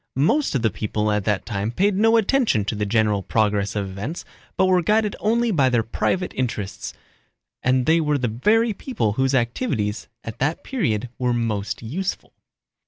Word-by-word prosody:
Most 165 Hz, -, +2 dB
of 125 Hz, -, 0 dB
the 110 Hz, -, +2 dB
people 105 Hz, 0 st, -1 dB
at 105 Hz, -1 st, 0 dB
that 105 Hz, -3 st, 0 dB
time 105 Hz, -1 st, -2 dB
paid 200 Hz, +11 st, +2 dB
no 225 Hz, +3 st, +4 dB
attention 225 Hz, -, +2 dB
to 105 Hz, -, -2 dB
the 105 Hz, -1 st, -2 dB
general 105 Hz, -2 st, +2 dB
progress 105 Hz, -1 st, 0 dB
of 100 Hz, -2 st, -1 dB
events 100 Hz, -, -6 dB, 0.3 s
but 190 Hz, -, +4 dB
were 185 Hz, -1 st, +3 dB
guided 210 Hz, +3 st, +1 dB
only 230 Hz, +2 st, +1 dB
by 140 Hz, -8 st, +3 dB
their 120 Hz, -2 st, +2 dB
private 180 Hz, -, -1 dB
interests, 110 Hz, -6 st, -4 dB, 0.7 s
and 125 Hz, 0 st, +2 dB
they 165 Hz, +1 st, +4 dB
were 150 Hz, -2 st, +1 dB
the 125 Hz, -3 st, -1 dB
very 215 Hz, -, +2 dB
people 185 Hz, -, -2 dB
whose 130 Hz, +3 st, +1 dB
activities 120 Hz, -, -1 dB, 0.2 s
at 115 Hz, -, -8 dB
that 145 Hz, +5 st, -1 dB
period 125 Hz, -, -1 dB
were 125 Hz, -1 st, +1 dB
most 110 Hz, -3 st, -2 dB
useful. 180 Hz, +12 st, -4 dB
125 Hz, 175 wpm, -22 LUFS, -, 0.7 s, no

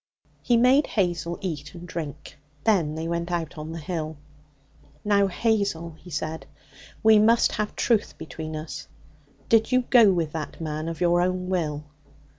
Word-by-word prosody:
He 240 Hz, -, +3 dB
made 255 Hz, +5 st, +5 dB
Hazel 175 Hz, -4 st, -1 dB
eat 160 Hz, -4 st, -5 dB
and 175 Hz, 0 st, -9 dB
drink. 150 Hz, -3 st, -7 dB, 0.2 s
Then 170 Hz, -9 st, +2 dB
they 160 Hz, +1 st, -3 dB
went 170 Hz, +1 st, -2 dB
out 170 Hz, -1 st, -2 dB
on 155 Hz, +1 st, -6 dB
the 165 Hz, -, -6 dB
hill. 155 Hz, -1 st, -4 dB, 0.9 s
'Now, 200 Hz, -1 st, +4 dB
Hazel,' 195 Hz, -5 st, 0 dB
he 180 Hz, -, -13 dB
said, 155 Hz, +1 st, -4 dB, 0.6 s
'we 220 Hz, -1 st, +7 dB
must 225 Hz, +2 st, +4 dB
have 210 Hz, 0 st, -3 dB
truth 225 Hz, -4 st, +1 dB
between 155 Hz, 0 st, -7 dB
us. 155 Hz, +1 st, -6 dB, 0.6 s
Did 225 Hz, +1 st, +3 dB
you 255 Hz, 0 st, +3 dB
go 230 Hz, -5 st, +7 dB
with 165 Hz, -4 st, -1 dB
that 155 Hz, -2 st, -6 dB
man 155 Hz, 0 st, -3 dB
of 165 Hz, -1 st, -7 dB
your 175 Hz, 0 st, +3 dB
own 180 Hz, 0 st, -1 dB
will?' 150 Hz, -5 st, -1 dB
175 Hz, 160 wpm, -25 LUFS, 160-205 Hz, 0.9 s, we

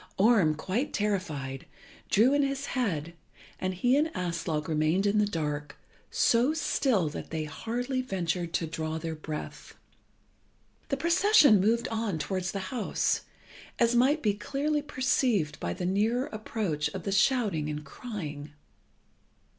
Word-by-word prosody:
Orm, 195 Hz, -7 st, +4 dB
quite 195 Hz, -, -2 dB
terrified, 155 Hz, -11 st, -2 dB, 0.4 s
drew 235 Hz, +7 st, +4 dB
in 285 Hz, -, +3 dB
his 275 Hz, 0 st, -1 dB
head, 170 Hz, -, -1 dB, 0.5 s
and 185 Hz, -, -1 dB
he 245 Hz, +8 st, +2 dB
and 300 Hz, +3 st, +3 dB
Aslog 165 Hz, -3 st, -2 dB
remained 160 Hz, +5 st, +1 dB
in 205 Hz, +1 st, +3 dB
the 210 Hz, -, +3 dB
dark, 150 Hz, -5 st, -3 dB, 0.3 s
so 245 Hz, +6 st, +3 dB
still 255 Hz, -, +1 dB
that -, -, -7 dB
they 160 Hz, -1 st, -2 dB
hardly 240 Hz, -, -3 dB
ventured 175 Hz, -6 st, -2 dB
to 165 Hz, -, 0 dB
draw 160 Hz, 0 st, -3 dB
their 160 Hz, 0 st, -4 dB
breath. 155 Hz, -1 st, -7 dB, 1.1 s
The 275 Hz, -, 0 dB
procession 335 Hz, -, +5 dB
moved 230 Hz, +4 st, +2 dB
on 220 Hz, -6 st, -1 dB
towards 185 Hz, +3 st, -2 dB
the 195 Hz, +3 st, -5 dB
house, 240 Hz, -4 st, 0 dB, 0.6 s
as 235 Hz, 0 st, +3 dB
might 275 Hz, +6 st, +3 dB
be 210 Hz, -2 st, +3 dB
clearly 285 Hz, +8 st, -1 dB
perceived 250 Hz, -, 0 dB
by 85 Hz, -, -2 dB
the 175 Hz, -, -4 dB
nearer 220 Hz, +7 st, +1 dB
approach 210 Hz, -8 st, -2 dB
of 185 Hz, -, -5 dB
the 195 Hz, -, -2 dB
shouting 195 Hz, -, +2 dB
and 150 Hz, 0 st, -5 dB
crying. 150 Hz, -, -7 dB
200 Hz, 140 wpm, -29 LUFS, 160-245 Hz, 1.1 s, procession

